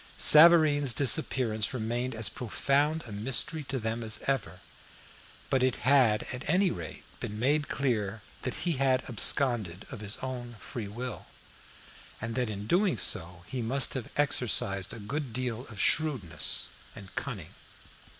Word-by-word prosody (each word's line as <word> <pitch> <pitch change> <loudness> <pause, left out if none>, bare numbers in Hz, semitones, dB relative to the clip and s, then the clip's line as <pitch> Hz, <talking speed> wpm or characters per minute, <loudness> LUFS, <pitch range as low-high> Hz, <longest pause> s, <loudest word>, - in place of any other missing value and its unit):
Savareen's 150 -5 +7
disappearance 130 -5 +1
remained 120 +2 -2
as 110 -1 +3
profound 140 +6 0
a 115 - -10
mystery 135 +9 +1
to 135 +1 -3
them 115 0 -3
as 110 -1 -1
ever, 105 -10 -2 0.9
but 130 - +2
it 130 -1 +2
had 125 -6 +4
at 125 +3 -5
any 185 +2 +3
rate 80 -3 -8 0.2
been 105 - -6
made 145 +6 +1
clear 110 -6 -2 0.2
that 130 - -4
he 170 -5 0
had 130 -1 +1
absconded 115 -6 0
of 125 - -7
his 105 0 -2
own 125 -2 -6
free 110 0 -7
will, 120 +3 -7 0.9
and 115 +1 -5
that 125 -2 -1
in 100 -1 -6
doing 180 - +2
so 85 -2 -1
he 130 +4 -5
must 130 +3 +2
have 130 -4 -5
exercised 100 -9 +1
a 115 - -7
good 130 +4 -5
deal 125 0 -4
of 105 -4 -11
shrewdness 135 - +1 0.3
and 100 -2 -12
cunning. - - -6
125 Hz, 150 wpm, -29 LUFS, 110-140 Hz, 0.9 s, Savareen's